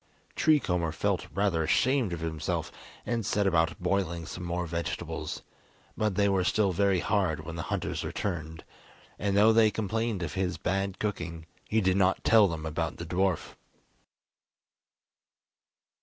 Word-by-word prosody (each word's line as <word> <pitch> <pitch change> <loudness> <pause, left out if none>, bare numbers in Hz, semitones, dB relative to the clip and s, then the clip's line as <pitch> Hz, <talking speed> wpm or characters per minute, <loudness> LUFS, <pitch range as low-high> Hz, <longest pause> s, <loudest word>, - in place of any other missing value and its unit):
Tree 155 -1 +4
Comber 90 - -1
felt - - -1
rather 95 -1 +1
ashamed 125 - +2
of 85 -2 -4
himself, 80 -2 -2 0.3
and 120 -2 -1
set 105 +1 +1
about 85 -3 +2
boiling 90 -2 -1
some 90 +3 -7
more 85 0 -2
vegetables, 85 0 -4 0.5
but 105 -3 0
they 100 0 +3
were 95 -2 +2
still 100 +1 +2
very 95 -1 +2
hard 95 -7 0
when 85 0 -6
the 80 - -3
hunters - - -2
returned, 80 -5 -4 0.6
and 100 0 0
though 110 +2 +6
they 110 -1 +6
complained 110 -1 -2
of 75 - -4
his 95 -2 -1
bad 95 +1 -1
cooking, 85 -6 -4 0.2
he 110 +1 +2
did 95 -1 +2
not 95 -1 +2
tell 110 -3 +6
them 80 -3 -4
about 80 +1 -2
the 85 - -6
dwarf. 90 +1 0
95 Hz, 150 wpm, -29 LUFS, 85-105 Hz, 0.6 s, though